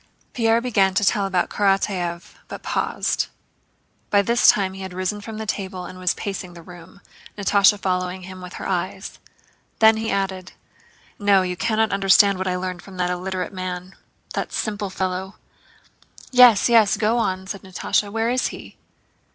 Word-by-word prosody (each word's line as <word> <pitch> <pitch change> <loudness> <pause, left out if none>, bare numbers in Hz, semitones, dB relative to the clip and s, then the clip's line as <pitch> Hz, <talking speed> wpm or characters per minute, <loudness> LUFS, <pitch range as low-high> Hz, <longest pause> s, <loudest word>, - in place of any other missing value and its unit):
Pierre 230 -1 +2
began 200 -6 +2
to 205 - +2
tell 200 0 +2
about 185 -2 0
Karatáev, 195 -4 -1
but - - -9
paused. - - -1 0.8
By 200 -1 +3
this 235 +4 +3
time 190 -2 +3
he 195 - -9
had 190 -1 -7
risen 185 +3 -2
from 220 +1 -8
the 220 - -5
table 190 -3 -4
and 185 +1 -10
was 180 -1 0
pacing 185 -3 -6
the 170 - -12
room, 175 +3 -14 0.4
Natásha 200 0 +4
following 185 -1 -2
him 185 0 -10
with 180 0 -9
her - - -6
eyes. 190 +1 -4 0.6
Then 220 0 +6
he 225 0 -3
added: 190 -2 -3 0.7
"No, 200 -2 +4
you 180 -1 -3
can't 220 +2 0
understand 195 0 +4
what 190 - -2
I 180 - 0
learned 180 -1 -4
from 195 -2 -13
that 180 0 0
illiterate 185 +1 -4
man—that 185 0 -7
simple 205 -2 -3
fellow." 190 0 -3 1.0
"Yes, 250 -5 +7
yes, 225 -4 +4
go 225 +2 +1
on!" 190 -4 -1
said 195 0 -6
Natásha. 195 +2 -1
"Where 225 +2 0
is 255 +1 +1
he?" - - -10
195 Hz, 165 wpm, -22 LUFS, 185-210 Hz, 1.0 s, Yes